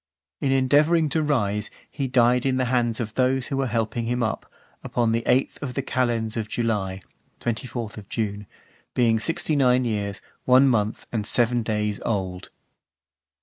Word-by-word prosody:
In 135 - 0
endeavouring 150 +5 +3
to 160 - +1
rise, 105 -9 0 0.2
he 135 -2 -2
died 125 -1 +3
in 130 -1 +1
the 130 - +1
hands 120 -2 +1
of 110 -2 -4
those 130 0 +1
who 135 - -2
were 135 -1 0
helping 115 0 -1
him 125 +1 0
up, 110 - -3 0.3
upon 120 -2 0
the 115 +1 +1
eighth 130 +2 +1
of 130 -3 -5
the 135 - -1
calends 120 -4 0
of 110 -2 -3
July 100 -5 -1 0.4
[24th 115 -3 -4
June], 105 -2 -3 0.5
being 115 -3 +3
sixty 160 +3 0
nine 130 -2 +3
years, 100 -3 -2 0.3
one 130 +2 +6
month, 110 -3 0
and 105 -3 -2
seven 120 0 +2
days 105 -2 -1
old. 95 -4 -3
120 Hz, 160 wpm, -24 LUFS, 110-130 Hz, 0.5 s, one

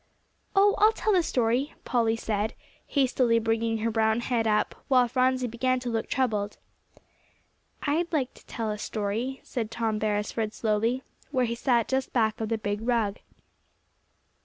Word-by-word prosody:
"Oh, 405 +1 +6
I'll 430 +2 +6
tell 435 -1 0
the 365 - +5
story," 250 -1 0
Polly 230 -2 +2
said, 220 0 -2 0.3
hastily 255 -4 +2
bringing 225 0 0
her 225 +1 -1
brown 220 +1 +2
head 235 -2 0
up, 210 -1 +2
while 255 -3 +4
Phronsie 255 +1 +2
began 255 +2 0
to 245 -1 -3
look 225 -1 -2
troubled. 215 -6 0 1.3
"I'd 325 +4 0
like 275 -6 0
to - - -18
tell 225 -3 -3
a 210 - -4
story," 220 +6 -3
said 225 -4 -3
Tom 225 -2 -1
Beresford 215 +1 -1
slowly, 225 +4 0 0.3
where 255 -3 +1
he 235 - -2
sat 235 -1 +1
just 265 0 -1
back 220 -3 +1
of 220 - -2
the 225 - +1
big 205 -1 -2
rug. 225 -4 0
230 Hz, 160 wpm, -27 LUFS, 220-255 Hz, 1.3 s, Oh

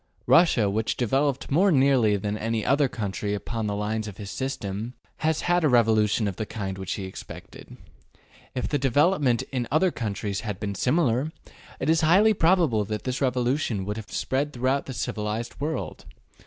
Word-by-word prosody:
Russia, 160 - +5
which 110 +3 -1
devel 135 +4 +2
oped 135 0 -6
more 185 +7 +4
nearly 130 -7 +4
than 105 +1 -3
any 110 0 -2
other 140 0 +3
country 105 -4 -3
upon 110 +1 -4
the 100 - -2
lines 110 +1 -2
of 105 - -8
his 100 -2 -7
system, 115 -3 -4 0.2
has 155 0 0
had 175 0 +1
a 150 - +4
revolution 110 -3 +3
of 95 - -4
the 110 - -2
kind 95 -3 -5
which 95 0 -3
he 100 - -5
expected. 95 0 -10 0.8
If 125 - -1
the 145 - 0
development 140 -1 +2
in 125 -3 -2
other 175 +4 +3
countries 100 -4 -3
had 105 -4 -5
been 100 -2 -3
similar, 130 - +1 0.5
it - - -2
is 160 +1 +3
highly 195 +8 +5
probable 165 - +3
that 105 0 -4
this 130 +1 -3
revolution 125 -5 0
would 105 +2 -3
have 110 - -8
spread 145 +3 -1
throughout 130 +3 0
the 135 - -5
civilized 110 0 -4
world. 155 -1 -4
120 Hz, 180 wpm, -25 LUFS, 105-145 Hz, 0.8 s, Russia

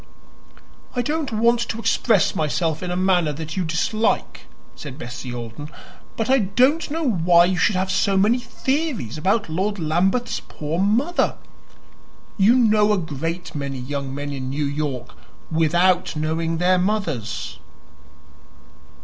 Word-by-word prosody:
"I 245 - +1
don't 300 +1 -2
want 235 +2 +3
to 225 - -2
express 225 -2 +2
myself 155 +1 0
in 180 - -4
a 180 - -1
manner 180 -4 +2
that 155 +1 -6
you 190 - 0
dislike," 175 +7 -1 0.3
said 140 -3 -8
Bessie 125 -2 -7
Alden; 120 +5 -7 0.5
"but 225 - -1
I 265 +1 +4
don't 255 - +2
know 315 0 -1
why 175 -5 +5
you 185 0 0
should 210 - +3
have 190 +1 0
so 195 +1 +2
many 215 +6 +3
theories 260 - -2
about 200 +6 +1
Lord 190 +6 -1
Lambeth's 185 +9 0
poor 155 +3 -5
mother. 235 - +1 1.0
You 210 +4 +5
know 215 -4 +4
a - - +2
great 165 +2 -4
many 140 -2 -4
young 135 +1 -4
men 145 0 -4
in 130 -1 -4
New 145 +2 -1
York 140 -3 -3 0.4
without 175 +3 +2
knowing 160 +2 -1
their 180 +2 +3
mothers." 180 - -2
180 Hz, 140 wpm, -22 LUFS, 155-215 Hz, 1.0 s, why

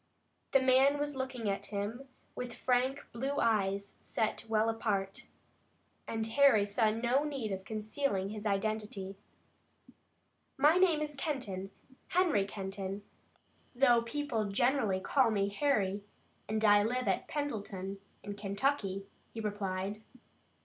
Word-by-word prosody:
The 270 - +6
man 265 +2 +5
was 290 0 -1
looking 260 -4 -3
at 195 -1 -1
him 215 +6 -4 0.3
with 250 -1 -5
frank 260 +2 +1
blue 270 +4 -2
eyes 200 -2 +1
set 220 0 -2
well 220 0 +3
apart, 205 -4 -1 0.8
and 225 -1 -2
Harry 225 -3 +5
saw 215 +2 +2
no 240 +5 +1
need 275 -8 -3
of 190 -1 -3
concealing 215 -1 -2
his 210 0 -6
identity. 205 -1 -2 1.4
"My 300 +5 +5
name 350 -5 +4
is 300 -1 -4
Kenton, 255 - -3 0.4
Henry 335 - +2
Kenton 195 0 -5 0.7
though 245 -2 +5
people 235 -2 -2
generally 215 -1 +2
call 255 +5 +3
me 200 -2 +1
Harry 200 -5 +1 0.5
and 215 0 +1
I 205 0 +7
live 250 +4 -1
at - - 0
Pendleton 200 -9 -4 0.2
in 205 - -5
Kentucky," 200 -1 -1 0.3
he - - -4
replied. 205 -1 -3
220 Hz, 125 wpm, -32 LUFS, 200-265 Hz, 1.4 s, I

